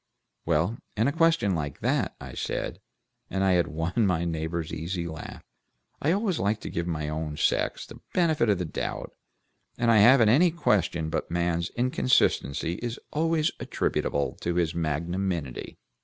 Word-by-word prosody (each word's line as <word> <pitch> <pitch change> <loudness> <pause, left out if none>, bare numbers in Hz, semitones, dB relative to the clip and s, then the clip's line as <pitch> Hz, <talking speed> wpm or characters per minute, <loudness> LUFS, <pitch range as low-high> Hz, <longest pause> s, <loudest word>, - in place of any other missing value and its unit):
"Well, 85 +8 +1 0.2
in 110 +4 +3
a - - +2
question 165 - +3
like 75 -4 -4
that," - - 0
I - - -9
said, - - -3 0.5
and 95 0 -1
I 90 -2 +4
won 85 +7 0
my 85 -2 +1
neighbor's 80 0 -3
easy 85 +2 -3
laugh, 80 -2 -8 0.6
"I 150 - +2
always 195 -2 0
like 105 +2 +1
to - - -6
give 85 +1 -2
my 75 -3 -2
own 75 0 -3
sex - - 0
the - - -12
benefit 160 -10 +2
of 100 - +3
the 90 - -2
doubt, 80 - -4 0.6
and 120 -1 +3
I 115 - +6
haven't 115 +1 +7
any 160 +10 +5
question 90 - 0
but 80 - -2
man's 85 0 0
inconsistency 120 - +1
is 120 0 -3 0.2
always 160 0 +2
attributable 70 -1 -1
to 85 0 -1
his 85 -2 +1
magnanimity." 85 -2 -2
90 Hz, 155 wpm, -27 LUFS, 80-120 Hz, 0.6 s, haven't